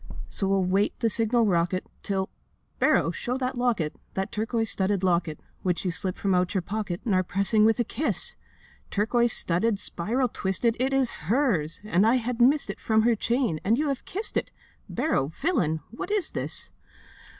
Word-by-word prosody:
'So 195 - -2
we'll 195 -1 +2
wait 195 +3 +1
the 230 -2 +1
signal 230 +1 +3
rocket, 180 -1 +1 0.2
Till... 190 -2 -1 0.5
Barrow, - - +3
show 250 +1 -3
that 260 0 -2
locket, 235 -11 0 0.2
That 190 0 -2
turquoise 225 +1 +2
studded 195 0 0
locket, 170 -4 +1 0.2
Which 180 0 -1
you 180 - +1
slipped 185 +2 -2
from 195 -1 0
out 180 +1 +1
your 185 - +1
pocket 195 -2 -4
And 215 - +1
are 185 - +4
pressing 200 +4 +3
with 225 +1 +3
a - - +3
kiss! 255 +7 0 0.5
Turquoise 235 +3 +1
studded, 200 +5 +1
spiral 230 +8 -1
twisted, 215 +4 0
It 260 +2 +1
is 270 -3 +2 0.2
hers! 205 - +1
And 210 0 +2
I 235 - +4
had 245 -1 -2
missed 280 +5 +4
it - - -11
From 220 -1 +2
her 235 +1 +4
chain; 235 - 0
and 220 +4 +2
you 300 +1 0
have 275 - -3
kissed 415 +4 -1
it: - - -2 0.4
Barrow, 135 - 0
villain, 165 - 0
what 235 - -6
is 415 -5 0
this? - - -2
215 Hz, 185 wpm, -26 LUFS, 185-245 Hz, 0.5 s, are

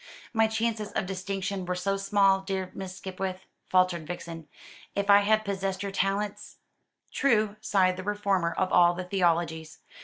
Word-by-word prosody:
"My 225 -1 +4
chances 220 -1 -2
of - - -1
distinction 195 +1 -3
were 180 0 -2
so 195 +2 -1
small, 195 -1 +3
dear 190 -1 -3
Miss 185 -1 -7
Skipwith," 190 0 -5 0.3
faltered 185 -3 +2
Vixen. 165 -2 -7 0.5
"If 200 0 +2
I 200 - +9
had 215 +1 +2
possessed 195 -1 -2
your 200 - -3
talents!" 195 +1 -2 0.5
"True," 215 -6 +2
sighed 185 -4 +2
the 185 - -5
reformer 200 -4 0
of 185 +1 -1
all 175 -1 +6
the 185 - -4
theologies. 170 -4 0
195 Hz, 155 wpm, -28 LUFS, 180-200 Hz, 0.5 s, I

